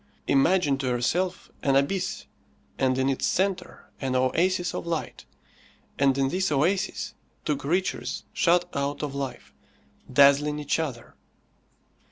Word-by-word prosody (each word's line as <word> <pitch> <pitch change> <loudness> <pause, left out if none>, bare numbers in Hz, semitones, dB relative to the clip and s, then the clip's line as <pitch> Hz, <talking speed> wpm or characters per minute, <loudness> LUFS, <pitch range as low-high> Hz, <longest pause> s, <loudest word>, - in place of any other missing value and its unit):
Imagine 140 0 +3
to 135 - -2
yourself 165 +10 -1
an 135 -1 +2
abyss, 140 +8 0 0.5
and 130 -1 +2
in 130 0 +1
its 135 -1 0
centre 190 -1 -2
an 130 -2 -1
oasis 175 +8 +1
of - - -5
light, 165 -2 -4 0.7
and 135 -1 +3
in 135 -1 +2
this 185 +2 0
oasis 175 +7 0 0.3
two 150 - +1
creatures 165 +7 -2
shut 175 +1 +3
out 140 +1 -2
of 145 -2 -3
life, 135 -3 -6 0.6
dazzling 140 +2 +5
each 150 +1 -1
other. 135 -8 -5
145 Hz, 130 wpm, -26 LUFS, 135-175 Hz, 0.7 s, dazzling